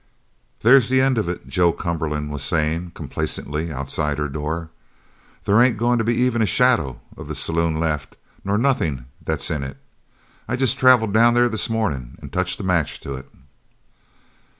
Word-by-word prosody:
"There's 125 +1 +6
the 130 0 +3
end 130 -2 +3
of 105 - -1
it," 85 - -5
Joe 90 -2 +3
Cumberland 75 -3 -3
was 75 -2 -4
saying 80 +4 -1
complacently 75 +3 -4
outside 70 +1 -2
her 75 0 -1
door. 80 +3 -4 0.7
"There 105 +4 +4
ain't 125 -3 +4
goin' 120 +2 +2
to - - +1
be 120 +2 +1
even 125 -1 +1
a 110 - +3
shadow 120 - +2 0.2
of - - -9
the - - -5
saloon 80 -1 -1
left 75 -3 -2 0.3
nor 100 +1 0
nothin' 85 - 0 0.2
that's - - -2
in 75 -3 -2
it. 65 0 -7 0.7
I 120 - -1
jest 130 -1 0
travelled 125 -5 +5
down 120 +2 +5
there 120 0 +4
this 110 +1 -1
mornin' 75 - -2
and - - -11
touched 90 0 -1
a - - -5
match 90 -5 0
to 70 - -6
it!" 65 -1 -9
85 Hz, 175 wpm, -22 LUFS, 75-115 Hz, 0.7 s, There's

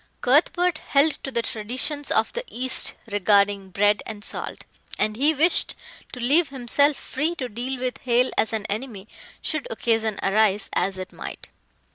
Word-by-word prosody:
Cuthbert 330 +6 +3
held 285 +2 +1
to - - -3
the 235 -3 -1
traditions 255 +8 -3
of - - +1
the - - -3
East 255 +2 +1 0.2
regarding 200 -1 +2
bread 205 +2 +2
and 210 -1 -7
salt, - - -4 0.3
and 215 0 +1
he 285 +7 +3
wished 320 +4 +2 0.4
to 250 - -8
leave 285 +7 +3
himself 275 +2 +2
free 310 +6 -2
to 260 -6 -4
deal 245 +3 -4
with 255 +1 -3
Hale 250 0 +2
as 220 - +1
an 220 -2 -3
enemy, 215 -1 -5 0.4
should 310 -2 -2
occasion 225 -2 0
arise, 205 0 +2
as 190 +1 0
it 185 0 -7
might. - - -8
240 Hz, 160 wpm, -24 LUFS, 210-280 Hz, 0.4 s, Cuthbert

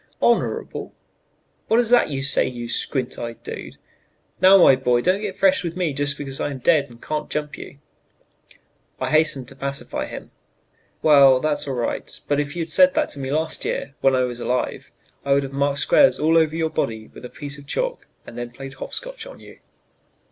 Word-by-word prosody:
"Honorable? - - 0 0.7
What 225 - +3
is 240 -1 +1
that 245 -8 +5
you 135 -2 -3
say, 140 - +2
you 120 -2 -6
squint 130 +1 -2
eyed 115 -1 -7
dude? - - -7 0.6
Now, 190 +1 +8
my 170 -7 +7
boy, 125 -2 +1
don't 185 +8 +1
get 200 -3 -5
fresh 195 -1 +3
with 170 0 -4
me 175 -5 0
just 140 0 +1
because 135 -2 -5
I - - -1
am 140 - -5
dead 140 +2 +2
and 120 -1 -15
can't 150 +3 -4
jump 150 -1 -3
you." 140 - -11 1.2
I - - -2
hastened 155 -5 +3
to - - -11
pacify 140 0 -4
him. - - -9 0.7
"Well, 140 -4 +7
that's 150 0 -1
all 135 - -2
right, 120 -1 -3
but 145 0 +1
if 145 +1 -3
you 170 - -1
had 160 - -9
said 275 - +5
that 310 -1 +1
to 145 - -5
me 135 -1 -4
last 155 +3 -1
year - - -3
when 135 -1 +4
I 130 - +2
was 125 -1 -4
alive 125 +1 -2 0.3
I 140 - +2
would 140 0 +2
have 135 0 -7
marked 140 0 0
squares 280 - +4
all 160 +2 +2
over 160 -1 +3
your 160 -1 -1
body 110 -1 -3
with - - -13
a 125 - -7
piece 145 -1 -7
of 140 - -15
chalk - - -3 0.2
and - - -11
then 120 0 -5
played 135 +3 -10
hop - - -7
scotch - - -6
on - - -12
you." - - -15
145 Hz, 210 wpm, -22 LUFS, 130-165 Hz, 1.2 s, Now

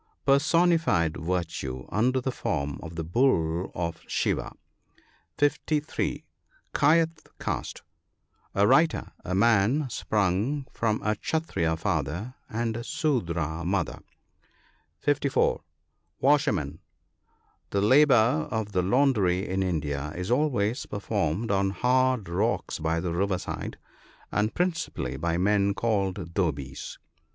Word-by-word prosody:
— - - -47
Personified 160 - +3
virtue, 80 -7 -3
under 125 +6 +2
the 130 +1 -2
form 70 - -2
of 85 0 -8
the 80 - -3
bull 85 - +1
of 85 -1 -3
Shiva. - - -1 0.9
(S3 150 +1 0 0.2
) - - -37
Kdyeth 160 +2 +2
caste. - - -4 0.4
— - - -39
A. 100 - +4
writer; 140 +8 +3
a 90 - -2
man 115 +7 +3
sprung 110 +7 0
from 110 -2 0
a 105 - +2
Kshattriya 100 - -1
father 90 - -2 0.2
and 115 0 -2
a 120 - -4
Sudra 85 - -1
mother. 90 -1 -1 1.0
(54.) 145 -1 +1 0.6
Washerman. 105 - +2 0.5
— - - -41
The 100 - 0
labour 130 +3 +5
of 110 -2 -2
the 95 -2 +1
laundry 100 -4 +2
in 95 +1 -1
India 75 -5 -2
is 90 +5 -3
always 125 -4 +1
per 105 - -4
formed 100 +1 -1
on 95 0 +2
hard 125 +2 +2
rocks 85 -1 -1
by 80 +1 0
the 85 0 -2
river 95 +1 +1
side, - - -5 0.5
and 105 +1 0
principally 165 - -1
by 85 +3 -1
men 100 +1 +2
called 95 -6 -1
"dhobies." 70 -8 -2
100 Hz, 125 wpm, -27 LUFS, 85-130 Hz, 1.0 s, labour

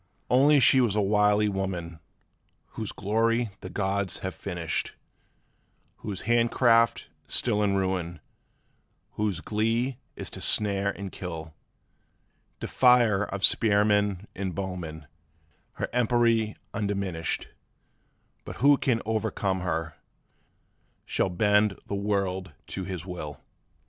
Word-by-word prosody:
'Once 140 +2 +5
she 130 +2 +6
was 115 -5 +1
a - - +2
wily 105 +1 +3
woman, 95 -5 -3 0.7
whose 110 -3 -5
glory 115 +3 0
the 95 - -8
gods 100 0 -2
have 95 -1 -4
finished, 85 -4 -4 1.0
Whose 100 -3 -6
handicraft 115 0 +3 0.2
still 105 -4 0
is 105 - +2
ruin, 95 -4 -1 0.9
whose 105 -5 -2
glee 115 +5 -1 0.2
is - - -6
to - - -8
snare 100 -1 +2
and 100 -1 -6
kill, 80 -4 -7 1.1
Defier 120 -5 +4
of 100 0 +1
spearman 105 -2 +3
and 95 -3 -4
bowman, 90 -5 -5 0.7
her - - -3
empery 115 -2 +2 0.2
undiminished; 100 -6 -2 0.9
But - - -8
whoso 140 +2 +5
can 125 -5 0
overcome 110 -3 -1
her, 80 -3 -3 1.1
shall - - 0
bend 105 +2 +2
the - - -6
world 100 -3 -1 0.2
to 95 - -4
his 90 -2 -5
will! 75 -6 -7
100 Hz, 110 wpm, -27 LUFS, 95-110 Hz, 1.1 s, she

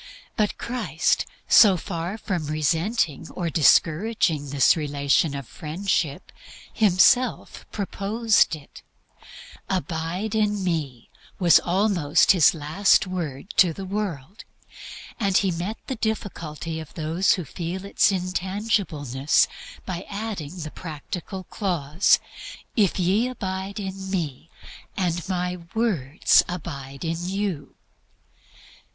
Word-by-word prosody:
But 210 -1 0
Christ, 245 +1 -1 0.2
so 195 -5 +7
far 175 +2 -4
from 180 -8 -3
resenting 160 - 0
or 170 -2 -3
discouraging 160 -1 +3
this 140 -1 +4
relation 145 -1 +1
of 140 -3 -6
Friendship, 160 -2 -2 0.4
Himself 220 +5 +3
proposed 210 0 +1
it. 150 -2 -14 0.9
"Abide 180 +2 -2
in 210 -2 +1
me" 150 -9 -3 0.3
was 175 -4 +6
almost 180 -5 +3
His 175 -4 +5
last 160 +8 +3
word 175 -4 -5
to 175 -4 +5
the 195 +4 -7
world. 195 - -4 0.8
And 195 -4 +2
He 195 -2 +2
partly 170 +1 -3
met 220 +1 -5
the 260 - -3
difficulty 165 -7 -4
of 160 - -10
those 165 +4 +2
who 180 - -3
feel 175 +6 -5
its 200 - +3
intangibleness 180 - 0 0.4
by 180 -1 -5
adding 200 -6 -5
the 155 -3 -6
practical 180 +4 -7
clause, 170 -3 +1 0.6
"If 205 -5 +2
ye 195 +7 +2
abide 195 -4 -4
in 190 -1 -6
Me, 165 -5 -3 0.5
and 175 -2 -1
My 180 -1 -1 0.2
words 175 - +3
abide 140 -5 -6
in 165 +2 -3
you." 195 -7 -3
180 Hz, 110 wpm, -24 LUFS, 155-200 Hz, 0.9 s, so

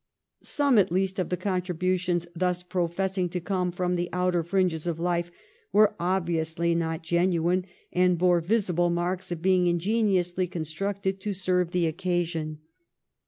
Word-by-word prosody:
Some 280 -6 +2
at 190 - +2
least 190 +1 0
of 185 - -1
the 180 - -1
contributions 180 -1 -1
thus 180 +1 0
professing 185 0 -1
to 180 - -3
come 180 0 -1
from 180 0 -1
the 175 0 -2
outer 180 -1 +1
fringes 175 -2 0
of 165 -1 -2
life 175 0 0 0.4
were 210 +2 +5
obviously 170 -2 0
not 165 -1 -2
genuine, 175 +1 +1 0.3
and 180 -1 +3
bore 175 0 +3
visible 180 -2 +1
marks 180 +2 -2
of 165 -1 -4
being 185 -1 +4
ingeni 195 +4 +2
ously 180 +1 -1
constructed 190 +3 -3
to 205 +1 -3
serve 180 -2 0
the 175 -1 +1
occasion. 165 -2 -2
180 Hz, 150 wpm, -27 LUFS, 170-185 Hz, 0.4 s, were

